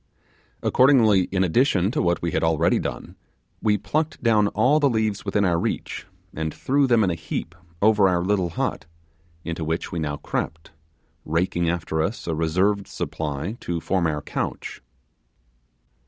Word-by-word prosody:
Accordingly, 115 Hz, -8 st, +5 dB
in 95 Hz, 0 st, 0 dB
addition 95 Hz, -, +2 dB
to 150 Hz, -, 0 dB
what 85 Hz, 0 st, 0 dB
we 85 Hz, -, 0 dB
had -, -, 0 dB
already 80 Hz, +1 st, +2 dB
done, -, -, -5 dB, 0.5 s
we 105 Hz, -1 st, +2 dB
plucked 150 Hz, +12 st, -2 dB
down 110 Hz, -3 st, +4 dB
all 125 Hz, +9 st, +3 dB
the 145 Hz, -2 st, +3 dB
leaves 110 Hz, -3 st, -1 dB
within 100 Hz, 0 st, +1 dB
our 85 Hz, -2 st, +2 dB
reach -, -, -3 dB, 0.3 s
and 80 Hz, 0 st, -3 dB
threw 135 Hz, -, +1 dB
them 120 Hz, -3 st, +4 dB
in 95 Hz, -, +2 dB
a -, -, 0 dB
heap 80 Hz, -1 st, -5 dB, 0.3 s
over 105 Hz, -2 st, +5 dB
our 90 Hz, -1 st, +1 dB
little 95 Hz, -2 st, +1 dB
hut, 80 Hz, -, -3 dB, 0.6 s
into 85 Hz, -1 st, -4 dB
which 80 Hz, +2 st, -2 dB
we 85 Hz, -, -3 dB
now 75 Hz, -2 st, -2 dB
crept, 80 Hz, +2 st, -4 dB, 0.5 s
raking 85 Hz, +1 st, 0 dB
after 80 Hz, -2 st, -1 dB
us 100 Hz, +9 st, -3 dB
a 85 Hz, -, -1 dB
reserved 95 Hz, +6 st, +1 dB
supply 80 Hz, +8 st, -4 dB
to 85 Hz, -1 st, -3 dB
form 90 Hz, +1 st, 0 dB
our 75 Hz, -2 st, -2 dB
couch. -, -, -4 dB
90 Hz, 160 wpm, -24 LUFS, 80-105 Hz, 0.6 s, Accordingly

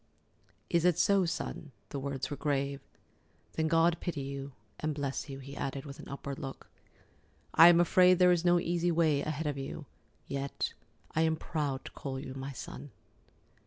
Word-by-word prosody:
"Is 170 Hz, +5 st, +2 dB
it 180 Hz, -2 st, +4 dB
so, 200 Hz, -2 st, +4 dB
Son?"—the 160 Hz, -4 st, -5 dB
words 135 Hz, -1 st, -3 dB
were -, -, -1 dB
grave. 140 Hz, -1 st, -1 dB, 0.7 s
"Then 160 Hz, 0 st, 0 dB
God 165 Hz, +1 st, +4 dB
pity 165 Hz, -5 st, -3 dB
you—and 135 Hz, 0 st, -6 dB
bless 140 Hz, 0 st, -3 dB
you," 135 Hz, -, -6 dB
he 140 Hz, +1 st, -9 dB
added, 135 Hz, 0 st, -4 dB
with 140 Hz, -1 st, -9 dB
an -, -, -10 dB
upward 140 Hz, 0 st, -5 dB
look. 135 Hz, -3 st, -8 dB, 0.8 s
"I 165 Hz, -, +9 dB
am 170 Hz, -1 st, +7 dB
afraid 180 Hz, +1 st, +6 dB
there 180 Hz, 0 st, +6 dB
is 175 Hz, -1 st, +2 dB
no 175 Hz, 0 st, +5 dB
easy 175 Hz, 0 st, 0 dB
way 160 Hz, -4 st, +3 dB
ahead 155 Hz, +1 st, -3 dB
of 145 Hz, -2 st, -2 dB
you. 135 Hz, +2 st, -6 dB, 0.4 s
Yet 140 Hz, 0 st, -3 dB, 0.4 s
I 160 Hz, -, +3 dB
am 160 Hz, 0 st, +3 dB
proud 145 Hz, -4 st, -3 dB
to -, -, -8 dB
call 135 Hz, -2 st, -5 dB
you 130 Hz, -1 st, -7 dB
my 135 Hz, +1 st, -5 dB
son." 140 Hz, +2 st, -8 dB
145 Hz, 170 wpm, -31 LUFS, 140-165 Hz, 0.8 s, I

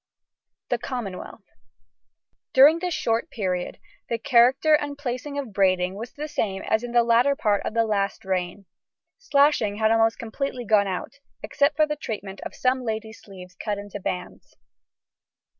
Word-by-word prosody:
THE 245 Hz, -, 0 dB
COMMONWEALTH. 220 Hz, -5 st, -6 dB, 1.1 s
During 290 Hz, +5 st, +7 dB
this 360 Hz, 0 st, -2 dB
short 230 Hz, -7 st, -1 dB
period 180 Hz, -4 st, -3 dB, 0.3 s
the 230 Hz, -, 0 dB
character 250 Hz, +6 st, +4 dB
and 290 Hz, -1 st, +1 dB
placing 280 Hz, +1 st, -4 dB
of 265 Hz, -7 st, -5 dB
braiding 185 Hz, -2 st, +2 dB
was 225 Hz, +4 st, -8 dB
the 300 Hz, +1 st, -5 dB
same 195 Hz, -9 st, -2 dB
as 220 Hz, +2 st, 0 dB
in 245 Hz, -, -5 dB
the 240 Hz, 0 st, +4 dB
latter 240 Hz, +4 st, +3 dB
part 210 Hz, -8 st, +1 dB
of 220 Hz, -, -5 dB
last 210 Hz, -2 st, 0 dB
reign; 185 Hz, +1 st, -2 dB, 0.5 s
slashing 285 Hz, -, +2 dB
had 220 Hz, +1 st, +2 dB
almost 225 Hz, 0 st, +3 dB
completely 245 Hz, +2 st, -4 dB
gone 205 Hz, -2 st, +3 dB
out, 190 Hz, +8 st, -5 dB, 0.2 s
except 285 Hz, 0 st, +1 dB
for 310 Hz, +1 st, +4 dB
the 300 Hz, 0 st, -3 dB
treatment 205 Hz, -8 st, -6 dB
of -, -, -7 dB
some 255 Hz, 0 st, +1 dB
ladies' 220 Hz, -1 st, -5 dB
sleeves 185 Hz, -2 st, -12 dB
cut 205 Hz, +3 st, -4 dB
into 205 Hz, 0 st, -7 dB
bands. 180 Hz, -1 st, -6 dB
225 Hz, 155 wpm, -24 LUFS, 200-270 Hz, 1.1 s, During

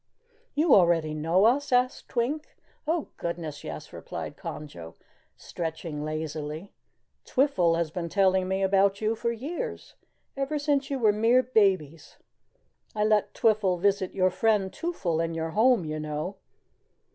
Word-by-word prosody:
"You 305 Hz, 0 st, +4 dB
already 170 Hz, -4 st, +4 dB
know 165 Hz, +6 st, +2 dB
us?" 270 Hz, +5 st, +2 dB
asked 250 Hz, +1 st, +1 dB
Twink. 270 Hz, +6 st, -2 dB, 0.3 s
"Oh, 325 Hz, -1 st, -1 dB
goodness 165 Hz, -3 st, -5 dB
yes," -, -, -8 dB
replied -, -, -6 dB
Conjo, 85 Hz, -, -8 dB, 0.4 s
stretching 160 Hz, -2 st, -5 dB
lazily. 155 Hz, +2 st, -5 dB, 0.5 s
"Twiffle 195 Hz, -, +2 dB
has 170 Hz, -2 st, -1 dB
been 170 Hz, 0 st, -4 dB
telling 190 Hz, 0 st, +2 dB
me 190 Hz, +1 st, 0 dB
about 195 Hz, +1 st, +3 dB
you 220 Hz, +1 st, 0 dB
for 235 Hz, +1 st, -1 dB
years 300 Hz, -, -5 dB, 0.4 s
ever 275 Hz, +2 st, -1 dB
since 285 Hz, -1 st, 0 dB
you 275 Hz, -, -1 dB
were 220 Hz, -5 st, +3 dB
mere 230 Hz, +4 st, +4 dB
babies. 190 Hz, -, +1 dB, 0.8 s
I 210 Hz, -, +1 dB
let 215 Hz, -1 st, +2 dB
Twiffle 210 Hz, -5 st, +2 dB
visit 195 Hz, 0 st, +1 dB
your 185 Hz, -1 st, +3 dB
friend 200 Hz, -1 st, +1 dB
Twoffle 180 Hz, -, -2 dB
in 165 Hz, 0 st, -3 dB
your 160 Hz, 0 st, -3 dB
home, 225 Hz, 0 st, +3 dB
you 155 Hz, 0 st, -4 dB
know. 155 Hz, +5 st, -4 dB
195 Hz, 140 wpm, -27 LUFS, 165-235 Hz, 0.8 s, You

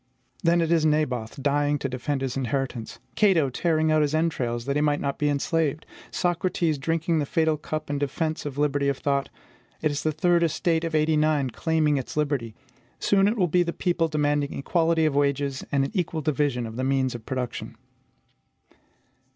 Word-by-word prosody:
Then 170 Hz, -2 st, +3 dB
it 165 Hz, 0 st, 0 dB
is 165 Hz, -2 st, +3 dB
Naboth 140 Hz, -6 st, 0 dB
dying 145 Hz, +1 st, +2 dB
to 135 Hz, -, -3 dB
defend 135 Hz, +2 st, -3 dB
his 135 Hz, -2 st, -2 dB
inheritance; 130 Hz, -3 st, -3 dB, 0.2 s
Cato 170 Hz, -10 st, +3 dB
tearing 160 Hz, +2 st, +1 dB
out 155 Hz, 0 st, +4 dB
his 150 Hz, +1 st, +1 dB
entrails 125 Hz, -8 st, -1 dB
that 140 Hz, 0 st, -1 dB
he 150 Hz, -, +2 dB
might 145 Hz, -1 st, +2 dB
not 140 Hz, -1 st, -3 dB
be 150 Hz, -, +2 dB
enslaved; 150 Hz, +1 st, 0 dB, 0.2 s
Socrates 175 Hz, -3 st, 0 dB
drinking 165 Hz, +2 st, 0 dB
the 145 Hz, -, 0 dB
fatal 160 Hz, 0 st, +2 dB
cup 155 Hz, +1 st, -5 dB
in 145 Hz, 0 st, -2 dB
defence 155 Hz, +3 st, -2 dB
of 145 Hz, -2 st, -6 dB
liberty 145 Hz, -1 st, +1 dB
of 140 Hz, -1 st, 0 dB
thought; 140 Hz, -1 st, -1 dB, 0.5 s
it 155 Hz, -, 0 dB
is 145 Hz, -, -2 dB
the 155 Hz, -, 0 dB
third 170 Hz, +3 st, +2 dB
estate 165 Hz, 0 st, +1 dB
of 165 Hz, -1 st, -2 dB
'89 155 Hz, -2 st, +2 dB
reclaiming 155 Hz, +4 st, +1 dB
its 135 Hz, +2 st, -5 dB
liberty: 140 Hz, -7 st, -1 dB, 0.4 s
soon 195 Hz, -1 st, +3 dB
it 220 Hz, +3 st, 0 dB
will 185 Hz, -4 st, +3 dB
be 180 Hz, +2 st, +3 dB
the 170 Hz, -1 st, -1 dB
people 175 Hz, -2 st, 0 dB
demanding 145 Hz, -2 st, 0 dB
equality 165 Hz, +2 st, +1 dB
of 155 Hz, -, +1 dB
wages 140 Hz, -1 st, 0 dB
and 140 Hz, -2 st, +2 dB
an -, -, -5 dB
equal 170 Hz, -5 st, -1 dB
division 140 Hz, -4 st, 0 dB
of 110 Hz, +1 st, -7 dB
the 130 Hz, -, -2 dB
means 135 Hz, -1 st, +1 dB
of 120 Hz, -2 st, -7 dB
production. 130 Hz, -3 st, -4 dB
150 Hz, 185 wpm, -25 LUFS, 140-160 Hz, 0.5 s, out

